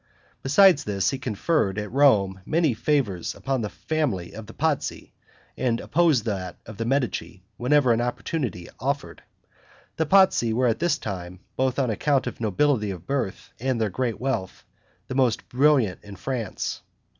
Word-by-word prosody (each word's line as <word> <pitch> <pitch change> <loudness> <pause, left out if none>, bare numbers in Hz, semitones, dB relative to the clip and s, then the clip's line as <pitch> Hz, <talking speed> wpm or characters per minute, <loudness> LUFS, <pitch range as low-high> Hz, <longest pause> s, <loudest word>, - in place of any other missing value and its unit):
Besides 155 +4 +5
this, 100 -3 0
he 135 - -4
conferred, 110 - 0
at 105 0 -4
Rome, 105 -9 +3
many 160 - +2
favors 115 - 0
upon 135 -2 -2
the 105 - -2
family 125 - -2
of 110 -1 -9
the 115 - -11
Pazzi, 155 -2 -2 0.4
and 120 -3 0
opposed 155 -8 +2
that 95 -5 -3
of 110 -1 -10
the 115 - -2
Medici, 115 -9 -1
whenever 130 0 +3
an 115 - +1
opportunity 120 - -3
offered. 140 +3 -3 0.8
The 160 - 0
Pazzi 185 - +4
were 125 +3 +2
at 115 -2 +1
this 170 -3 +2
time, 90 -6 -6
both 130 0 0
on 130 -4 +1
account 135 +5 +1
of - - -6
nobility 110 +1 +1
of 90 -3 -7
birth 135 -8 -3
and 130 -1 -1
their 110 -3 0
great 120 +2 -2
wealth, 120 -8 -3 0.4
the - - -5
most 130 -4 +1
brilliant 130 -7 +3
in 100 -1 -10
France. 120 -1 -4
120 Hz, 160 wpm, -25 LUFS, 105-140 Hz, 0.8 s, Besides